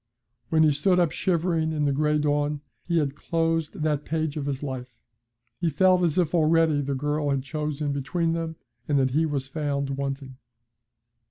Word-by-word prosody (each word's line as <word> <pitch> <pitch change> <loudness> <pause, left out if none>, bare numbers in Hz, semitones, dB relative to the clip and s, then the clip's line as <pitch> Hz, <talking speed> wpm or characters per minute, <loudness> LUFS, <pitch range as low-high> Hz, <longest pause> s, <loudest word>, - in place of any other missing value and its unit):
When 160 -1 +4
he 155 - +5
stood 180 +6 +2
up 170 -3 +3
shivering 165 -3 0
in 150 -1 0
the 140 - +2
gray 150 +2 +2
dawn, 145 0 0 0.3
he 170 -1 +1
had 145 -4 +1
closed 165 0 -1
that 150 -2 0
page 160 -1 -2
of 145 -2 -3
his 140 0 -3
life. 125 -3 -6 0.6
He 170 -2 +1
felt 185 +4 +4
as 170 -2 +1
if 175 -3 +1
already 160 -2 +3
the 140 0 -2
girl 145 +2 -1
had 135 -1 0
chosen 150 0 -3
between 165 +4 -1
them, 165 -1 -3 0.3
and 145 - +2
that 130 -1 +2
he 160 +4 +2
was 140 -3 -2
found 140 -1 -2
wanting. 135 -1 -4
150 Hz, 180 wpm, -26 LUFS, 140-165 Hz, 0.6 s, he